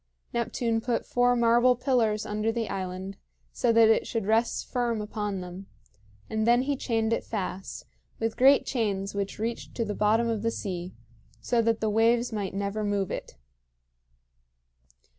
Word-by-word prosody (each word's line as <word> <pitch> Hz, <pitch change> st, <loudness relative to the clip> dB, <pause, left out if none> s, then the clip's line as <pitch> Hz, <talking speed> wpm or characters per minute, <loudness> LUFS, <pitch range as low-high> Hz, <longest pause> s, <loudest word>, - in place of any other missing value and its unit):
Neptune 230 Hz, -1 st, -1 dB
put 240 Hz, 0 st, -1 dB
four 245 Hz, 0 st, +2 dB
marble 240 Hz, +1 st, +4 dB
pillars 235 Hz, -4 st, +1 dB
under 215 Hz, +2 st, -1 dB
the 225 Hz, -1 st, -3 dB
island 190 Hz, +1 st, -5 dB, 0.4 s
so 240 Hz, -, +2 dB
that 230 Hz, -1 st, +6 dB
it 220 Hz, -, +3 dB
should 225 Hz, -4 st, -2 dB
rest 225 Hz, +3 st, +1 dB
firm 240 Hz, -3 st, -1 dB
upon 210 Hz, -2 st, -3 dB
them; 180 Hz, +2 st, -9 dB, 0.6 s
and 220 Hz, 0 st, -1 dB
then 240 Hz, +1 st, +5 dB
he 285 Hz, +1 st, 0 dB
chained 225 Hz, -3 st, 0 dB
it -, -, -1 dB
fast, 195 Hz, -3 st, -5 dB, 0.3 s
with 225 Hz, 0 st, -1 dB
great 270 Hz, +2 st, +5 dB
chains 200 Hz, -5 st, -1 dB
which 200 Hz, -1 st, -3 dB
reached 230 Hz, +2 st, -4 dB
to 230 Hz, -, -1 dB
the 210 Hz, -, -3 dB
bottom 220 Hz, +3 st, +2 dB
of 225 Hz, -3 st, -1 dB
the 230 Hz, -, +1 dB
sea, 185 Hz, -5 st, -5 dB, 0.4 s
so 230 Hz, -, +1 dB
that 225 Hz, 0 st, +1 dB
the 220 Hz, -, +1 dB
waves 230 Hz, +2 st, +2 dB
might 200 Hz, -3 st, -3 dB
never 200 Hz, +2 st, -2 dB
move 205 Hz, -2 st, -1 dB
it. -, -, -6 dB
225 Hz, 160 wpm, -27 LUFS, 205-235 Hz, 0.6 s, that